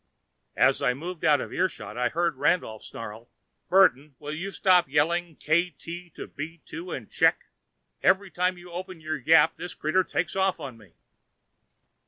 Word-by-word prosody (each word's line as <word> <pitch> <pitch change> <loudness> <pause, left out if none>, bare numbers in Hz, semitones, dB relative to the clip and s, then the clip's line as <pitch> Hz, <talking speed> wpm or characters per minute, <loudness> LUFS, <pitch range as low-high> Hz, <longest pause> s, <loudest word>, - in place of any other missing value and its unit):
As - - +4
I 125 - +2
moved 170 +4 -7
out 145 -3 +4
of - - -7
earshot, 180 - -2
I 125 0 +1
heard 170 -1 0
Randolph 135 -6 0
snarl, 115 +1 -9 0.4
"Burton, 155 -7 +4
will 150 +1 -6
you 180 +6 -4
stop 185 -5 +3
yelling, 165 +3 +1
'Kt 170 +5 0 0.4
to - - -6
B 165 +3 -8
2 165 +3 -8
and 115 -5 -5
check?' - - +2 0.5
Every 190 +1 +3
time 180 +2 0
you 175 0 -13
open 180 0 -7
your 155 0 -3
yap, 150 +3 +4
this 175 - -7
critter 180 +5 +1
takes 180 +1 -2
off 190 -2 +1
on 140 -5 -7
me." 110 -4 -19
165 Hz, 165 wpm, -26 LUFS, 145-180 Hz, 0.5 s, As